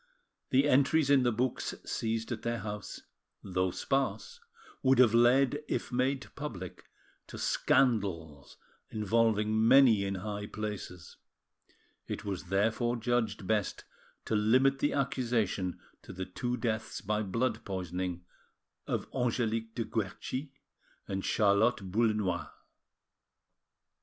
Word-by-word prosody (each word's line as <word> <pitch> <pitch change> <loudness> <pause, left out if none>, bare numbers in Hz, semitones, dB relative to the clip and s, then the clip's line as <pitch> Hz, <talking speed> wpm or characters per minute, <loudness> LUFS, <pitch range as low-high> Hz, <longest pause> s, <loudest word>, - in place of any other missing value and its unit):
The 135 +3 +4
entries 140 +2 +3
in 140 -2 +6
the 120 -1 +2
books 120 +3 -1
seized 115 +1 -2
at 115 - -3
their 120 0 -1
house, 105 0 -6 0.4
though 95 -1 0
sparse, 135 - -2 0.4
would 135 -1 +4
have 120 -3 +6
led, 130 +5 +4
if - - -2
made 130 +2 0
public, 100 - -7 0.4
to - - -9
scandals, 90 - 0 0.3
involving 110 0 +2
many 125 -5 +6
in 100 0 -2
high 105 +2 -5
places; 105 -4 -6 0.9
it - - -5
was 95 -3 -4
therefore 110 +6 +1
judged 120 -3 -1
best 105 0 -1 0.4
to 110 - -1
limit 130 +6 +3
the 145 - +1
accusation 120 -9 -1 0.2
to - - -11
the 95 0 -5
two 120 +7 -3
deaths 110 -2 -2
by 105 +1 -1
blood 115 +6 -1
poisoning 90 -2 -4 0.6
of - - -2
Angelique 115 -3 -1
de 115 - -2
Querchi 130 +6 -4 0.6
and 95 0 -3
Charlotte 100 0 +2
Boullenois. 105 -6 0
110 Hz, 115 wpm, -31 LUFS, 100-125 Hz, 0.9 s, in